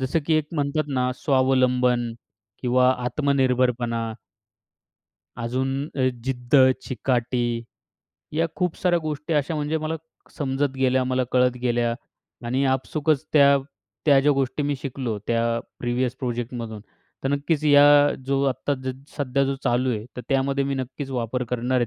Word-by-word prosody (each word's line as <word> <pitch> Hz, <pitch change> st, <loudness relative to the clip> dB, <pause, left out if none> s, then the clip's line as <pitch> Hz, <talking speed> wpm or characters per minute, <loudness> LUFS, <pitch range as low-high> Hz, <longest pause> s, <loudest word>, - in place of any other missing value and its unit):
जसं 130 Hz, +5 st, 0 dB
की 160 Hz, -, +3 dB
एक 155 Hz, -1 st, +1 dB
म्हणतात 145 Hz, +1 st, -1 dB
ना, 125 Hz, 0 st, +1 dB
स्वावलंबन 125 Hz, -3 st, +2 dB, 0.5 s
किंवा 125 Hz, +1 st, +4 dB
आत्मनिर्भरपणा 125 Hz, -4 st, +1 dB, 1.2 s
अजून 125 Hz, +3 st, -2 dB, 0.3 s
अ, 130 Hz, -1 st, +3 dB, 0.2 s
जिद्द, 125 Hz, -1 st, -3 dB, 0.3 s
चिकाटी 120 Hz, -1 st, -1 dB, 0.7 s
या 165 Hz, +2 st, +1 dB
खूप 180 Hz, -2 st, -1 dB
साऱ्या 175 Hz, -2 st, +2 dB
गोष्टी 155 Hz, +1 st, -3 dB
अशा 150 Hz, +2 st, 0 dB
म्हणजे 150 Hz, +1 st, -1 dB
मला 155 Hz, +1 st, -3 dB, 0.4 s
समजत 140 Hz, 0 st, 0 dB
गेल्या, 130 Hz, 0 st, +2 dB
मला 130 Hz, 0 st, 0 dB
कळत 125 Hz, -1 st, +3 dB
गेल्या. 120 Hz, -1 st, +1 dB, 0.5 s
आणि 130 Hz, +3 st, +1 dB
आपसूकच 145 Hz, +3 st, 0 dB
त्या, 140 Hz, -2 st, +6 dB, 0.5 s
त्या 140 Hz, -2 st, +6 dB
ज्या 145 Hz, +1 st, +4 dB
गोष्टी 135 Hz, +2 st, -1 dB
मी 145 Hz, 0 st, 0 dB
शिकलो 125 Hz, -5 st, -3 dB
त्या 115 Hz, 0 st, +1 dB, 0.2 s
प्रिव्हियस 125 Hz, +1 st, -1 dB
प्रोजेक्टमधून. 120 Hz, -3 st, -4 dB, 0.4 s
तर -, -, +1 dB
नक्कीच 145 Hz, +2 st, 0 dB
या 145 Hz, -1 st, +7 dB, 0.4 s
जो 135 Hz, 0 st, +1 dB
आत्ता 140 Hz, +2 st, -1 dB
ज 130 Hz, -, -1 dB, 0.2 s
सध्या 140 Hz, -1 st, +1 dB
जो 135 Hz, 0 st, -1 dB
चालू 125 Hz, +2 st, +2 dB
आहे, 110 Hz, -2 st, -3 dB
तर 125 Hz, -, -3 dB
त्यामध्ये 135 Hz, 0 st, +1 dB
मी 140 Hz, 0 st, -1 dB
नक्कीच 135 Hz, +1 st, -5 dB
वापर 125 Hz, 0 st, -2 dB
करणार 125 Hz, +2 st, -1 dB
आहे 120 Hz, -, +1 dB
130 Hz, 145 wpm, -24 LUFS, 125-140 Hz, 1.2 s, या